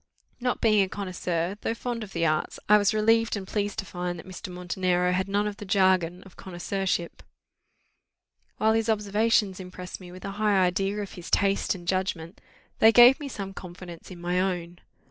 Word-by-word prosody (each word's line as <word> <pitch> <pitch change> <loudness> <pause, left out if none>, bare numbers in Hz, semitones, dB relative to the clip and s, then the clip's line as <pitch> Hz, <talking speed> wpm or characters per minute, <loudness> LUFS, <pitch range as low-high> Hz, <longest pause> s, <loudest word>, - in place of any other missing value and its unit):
Not 250 0 -1
being 215 -3 +4
a 190 - +1
connoisseur, 185 -2 -3
though 225 - -1
fond 235 -1 -4
of 200 - -10
the 165 -2 0
arts, 155 -1 -1
I 210 0 +7
was 205 - +3
relieved 225 +1 +2
and 195 - -6
pleased 205 0 -2
to - - -3
find 180 -1 -4
that 165 - -10
Mr. 185 0 -8
Montenero 180 0 0
had 190 +1 0
none 205 +1 +1
of 205 -1 -4
the - - -8
jargon 185 -3 +2
of 195 - -16
connoisseurship: 185 -1 -3 1.4
while 220 0 +3
his 225 0 0
observations 210 -1 +1
impressed 180 0 -8
me 180 -1 -11
with 185 +1 -10
a 195 - -4
high 210 -2 +3
idea 195 +3 +1
of 200 - -9
his 175 -1 -9
taste 200 0 +2
and 175 -2 -11
judgment, 185 -2 -2 0.4
they 220 - +7
gave 245 +5 +8
me 290 - -5
some 195 -7 -6
confidence 175 -2 -10
in 180 -2 -10
my 175 +1 0
own. 175 -2 -2
190 Hz, 190 wpm, -26 LUFS, 180-210 Hz, 1.4 s, gave